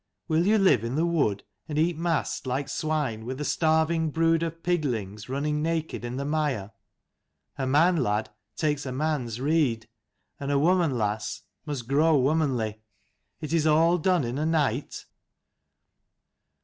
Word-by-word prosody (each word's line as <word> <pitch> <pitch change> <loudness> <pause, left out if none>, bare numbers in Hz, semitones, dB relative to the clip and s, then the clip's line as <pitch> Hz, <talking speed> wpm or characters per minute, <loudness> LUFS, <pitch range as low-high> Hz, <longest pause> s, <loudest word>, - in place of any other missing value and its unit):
Will 165 +2 +2
you 215 +1 +5
live 190 - +4
in 115 +3 -3
the 160 +3 +2
wood, 140 -13 0 0.3
and 150 - -3
eat 165 +2 +2
mast 165 -4 -2
like 135 +2 -1
swine, 140 -6 -2
with 130 +3 -5
a 150 - -3
starving 160 +1 +2
brood 165 +1 +2
of 165 0 -4
piglings 120 - -2
running 150 +3 -1
naked 160 -3 -2
in 120 +1 -4
the 140 - -3
mire? 145 -9 -1 0.9
A 130 - -1
man, 165 +6 +4
lad, 105 -6 0 0.2
takes 150 -3 -1
a - - -3
man's 130 -5 -2
rede: 135 -6 +1 0.5
and 140 - -4
a 140 - +3
woman, 165 -2 +2
lass, 105 -1 -2 0.2
must 135 -6 -4
grow 150 +3 +4
womanly. 130 -7 0 0.6
Is 155 +1 -4
it 160 -2 +2
all 165 +3 +4
done 180 -1 +2
in 120 +3 -3
a 155 - 0
night?" 145 -5 -1
150 Hz, 155 wpm, -26 LUFS, 125-160 Hz, 0.9 s, you